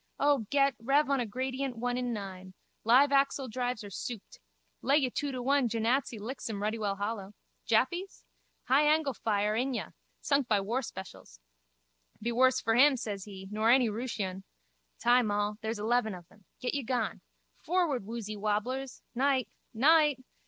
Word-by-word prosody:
O, 280 -6 +2
get, 275 -1 +3
rev 275 +5 +2
on 275 - +2
a 240 - -1
gradient 260 +2 -3
one 245 +1 -1
in 250 -1 -2
nine. 190 -3 -7 0.3
Live 260 +5 +5
axle 275 -1 +2
drives 245 -1 -3
are 205 - -9
souped. 225 +2 -7 0.4
Lay 275 +3 +3
you 265 -4 +1
two 285 +2 -2
to 255 -2 -4
one 275 -1 +2
Jenatzy 230 +2 0
licks 230 +4 -6
him 205 -2 -4
ruddy 215 +2 -1
well 200 -2 -1
hollow. 205 0 -4 0.3
Jappies? 345 - 0 0.4
High 280 +4 +4
angle 305 -3 +1
fire, 210 -1 0
inyah! 250 +2 -2 0.3
Sunk 280 -3 +1
by 210 -3 +3
war 225 +7 -1
specials. 185 - -10 0.8
Be 235 +2 -2
worse 255 +2 +4
for 225 - 0
him, 270 +3 +6
says 205 -4 -5
he, 190 -2 -9
nor 215 +2 +1
any 245 -1 +5
Rooshian. 210 -4 -4 0.6
Time 240 -2 +4
all. 205 +1 -1
There's 220 0 -3
eleven 220 -1 +1
of 175 -2 -12
them. 205 -3 -23
Get 250 - -2
ye 285 - 0
gone. 245 -2 -2 0.4
Forward, 335 - +1
woozy 215 0 -5
wobblers! 215 +6 -2
Night. 260 -2 +1 0.2
Night. 295 +3 +4
240 Hz, 165 wpm, -30 LUFS, 210-270 Hz, 0.8 s, him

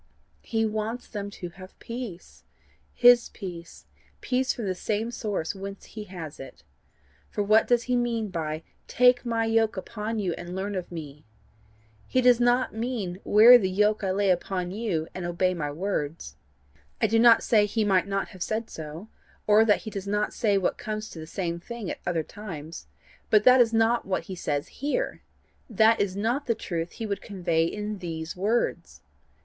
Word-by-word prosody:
He 225 -1 0
wants 220 +3 -3
them 205 -2 -5
to 180 -3 -7
have 185 +2 -13
peace 230 -7 -8 0.5
HIS 245 -1 +6
peace 175 -4 -9 0.3
peace 260 +1 0
from 230 - -5
the 190 - 0
same 215 +5 -2
source 205 -8 -3
whence 195 0 -8
he 215 -1 -8
has 170 -6 -8
it. 135 - -11 0.7
For 205 - -2
what 215 +2 +4
does 240 -1 +3
he 250 +1 0
mean 235 -3 0
by 160 -2 -4 0.2
TAKE 250 0 +4
MY 230 -1 +1
YOKE 225 -1 +2
UPON 215 +3 -4
YOU, 190 -5 -1
AND 175 +1 -7
LEARN 195 +2 -3
OF 185 -2 -5
ME? 150 -4 -8 0.8
He 255 - +1
does 250 -1 +5
not 245 +1 +2
mean 220 -6 -3
WEAR 235 +4 +8
THE 190 -4 0
YOKE 210 +3 +2
I 190 - 0
LAY 195 +1 +2
UPON 180 0 -2
YOU, 190 -7 -2
AND 185 - -5
OBEY 185 +1 +1
MY 150 -4 -3
WORDS. 150 - -3 0.6
I - - +3
do 225 +2 +3
not 230 0 +7
say 210 -3 +4
he 215 +1 0
might 190 -2 +2
not 195 0 -2
have 185 -3 -13
said 220 +4 -2
so, 160 +5 -8 0.4
or 215 +1 +6
that 210 -2 +3
he 220 - -7
does 200 -1 -6
not 210 +1 0
say 205 -3 +2
what 190 - -1
comes 215 0 -5
to 165 - -9
the 160 - -8
same 170 -1 -3
thing 230 0 -6
at - - -6
other 165 -2 0
times, 165 - -9 0.4
but 210 -1 +5
that 255 +1 +7
is 230 -2 +3
not 225 0 +2
what 190 - -1
he 190 - -7
says 145 -4 -2
here 295 - -2 0.5
that 220 +1 +4
is 195 -2 -1
not 235 +8 -1
the 230 - +2
truth 170 -5 -4
he 225 - -5
would 200 -2 -3
convey 170 -5 0
in 210 +3 -4
these 165 -2 -5
words. 215 +6 -1
205 Hz, 185 wpm, -26 LUFS, 180-225 Hz, 0.8 s, WEAR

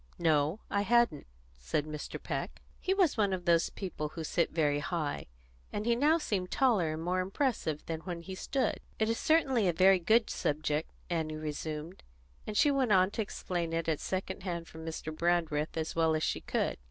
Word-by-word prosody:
"No, 155 +2 +2
I 200 - +2
hadn't," 235 - +2 0.3
said 145 - -1
Mr. 150 -1 -5
Peck. - - -4 0.2
He 375 - -1
was 375 -9 +3
one 200 -3 +2
of 180 -2 -3
those 170 -1 +4
people 165 -6 -4
who 160 +1 -6
sit 170 +2 +1
very 145 -3 +1
high, 145 - -2 0.4
and 205 - -3
he 235 0 +3
now 300 +6 +4
seemed 195 - -2
taller 210 - +2
and 160 +1 -5
more 180 +2 0
impressive 190 - -1
than 160 -1 -3
when 170 0 -5
he 190 +3 -7
stood. 265 +7 -1 0.2
"It 220 0 +1
is 230 - 0
certainly 270 - +3
a 175 - +2
very 190 +2 +6
good 220 +6 +3
object," 150 +1 0 0.2
Annie 160 -2 -1
resumed; 155 +2 -5 0.5
and 210 - -3
she 290 - +5
went 265 -5 +1
on 185 0 +5
to 220 - -2
explain 175 -5 -3
it 165 0 -1
at 160 -2 +1
second 190 0 -3
hand 170 -3 -4
from 160 0 -10
Mr. 160 -1 -5
Brandreth 165 -2 0
as 160 0 -2
well 160 -1 +3
as 155 - -1
she - - 0
could. - - -1
175 Hz, 195 wpm, -31 LUFS, 155-210 Hz, 0.5 s, very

